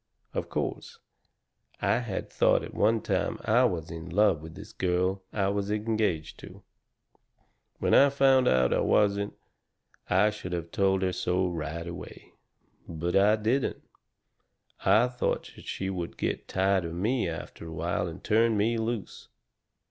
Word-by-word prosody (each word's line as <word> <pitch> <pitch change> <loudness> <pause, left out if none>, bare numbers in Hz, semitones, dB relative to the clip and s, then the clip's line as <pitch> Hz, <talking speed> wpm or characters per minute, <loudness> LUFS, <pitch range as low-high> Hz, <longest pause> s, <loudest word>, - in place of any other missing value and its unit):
Of - - -3
course, - - -4 0.8
I - - +2
had 115 -6 -4
thought - - +3
at - - -8
one 110 +1 +2
time - - -1
I 120 +4 +4
was 85 -8 -2
in 80 +1 -7
love 100 -4 +3
with 80 0 -10
this - - -11
girl 90 +1 0
I 100 -2 0
was 100 0 -2
engaged 105 -6 -1
to. - - -12 1.1
When - - 0
I 140 - +7
found 135 -2 +4
out 65 -1 +3
I - - +2
wasn't, 100 -1 +2 0.7
I 105 +4 +4
should 95 -4 -7
have 85 -1 -4
told 95 -1 +2
her 95 -1 0
so 90 +1 0
right 85 -1 -4
away. 85 - -9 0.6
But 85 +2 -2
I 100 +2 +5
didn't. 115 +5 -1 1.0
I 110 +3 +5
thought 125 -1 -2
that - - -13
she 95 0 -3
would 90 -3 -5
get - - -3
tired 95 0 +1
of 85 0 -5
me 110 +2 0
after 80 0 -7
a - - -8
while 85 +2 -2
and 85 +1 -9
turn 115 0 +3
me 115 +3 +1
loose. 110 -3 -4
95 Hz, 155 wpm, -28 LUFS, 85-110 Hz, 1.1 s, I